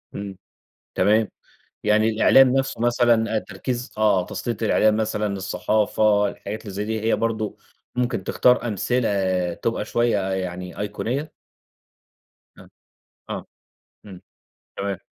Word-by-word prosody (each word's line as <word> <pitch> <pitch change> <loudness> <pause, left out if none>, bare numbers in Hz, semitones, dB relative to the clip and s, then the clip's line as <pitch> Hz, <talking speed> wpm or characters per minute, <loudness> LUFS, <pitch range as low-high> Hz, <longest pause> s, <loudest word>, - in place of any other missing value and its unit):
إمم، 100 -2 -6 0.6
تمام، 110 0 +3 0.6
يعني 110 +1 +3
الإعلام 130 +4 +6
نَفسه 135 -3 -1
مثلًا، 120 -2 +2
آآ - - +4
تركيز، 125 +3 -5
آه 100 -4 +3
تَسليط 115 -2 -4
الإعلام 110 0 +3
مثلًا، 105 -1 -1
الصحافة، 105 +2 +1
الحاجات 105 +2 -6
اللي 100 - -8
زي 100 +2 -3
دي 110 0 -2
هي 110 +1 +1
برضه 110 -2 -2 0.4
ممكن 120 -5 -1
تختار 125 +2 +3
أمثلة 95 -5 0
تبقى 115 -2 -2
شوية 120 -1 +1
يعني 90 -1 -4
أيقونية؟ 125 +9 -3 1.3
آه، - - -15 0.6
آه، - - -5 0.6
إمم، 95 -3 -11 0.6
تمام. 100 -1 -2
110 Hz, 120 wpm, -23 LUFS, 100-115 Hz, 1.3 s, الإعلام